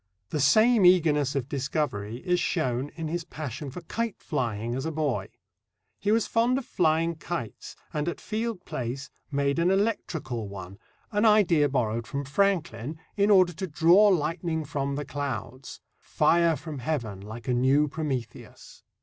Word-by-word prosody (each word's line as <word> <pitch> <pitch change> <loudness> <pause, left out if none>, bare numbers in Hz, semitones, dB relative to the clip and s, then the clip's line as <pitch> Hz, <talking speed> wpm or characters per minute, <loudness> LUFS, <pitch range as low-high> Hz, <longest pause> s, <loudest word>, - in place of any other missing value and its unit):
The 150 - -1
same 215 - +5
eagerness 155 -6 +4
of 135 -3 -1
discovery 130 -5 -3
is 180 -1 +2
shown 130 -5 -1
in 165 -1 -4
his 170 +2 -2
passion 150 -4 -6
for 175 - -8
kite 230 +5 -3
flying 120 - -2
as 130 +2 -3
a - - -2
boy: 150 -4 -1 0.7
He 205 - 0
was 225 0 +3
fond 235 +3 +2
of 270 - -4
flying 165 +2 +1
kites, 150 -7 -6 0.2
and 150 +2 -1
at - - -6
Field 225 -3 -3
Place 130 +4 -5 0.2
made 140 +1 0
an 170 +2 +3
electrical 160 - -1
one, 95 0 -9 0.3
an 205 0 +1
idea 185 -9 +5
borrowed 115 -3 -1
from 140 0 -4
Franklin, 160 - 0 0.2
in 205 0 +2
order 185 -3 +5
to 190 +4 -4
draw 170 +6 +5
lightning 165 -2 0
from 140 -1 -2
The 145 +1 -4
clouds 135 -2 -5 0.2
fire 170 -1 +3
from 150 -2 -7
Heaven, 120 -8 -3
like 110 +5 -9
a 125 - +2
new 135 +4 +3
Prometheus. 140 -6 -6
150 Hz, 160 wpm, -27 LUFS, 130-175 Hz, 0.7 s, same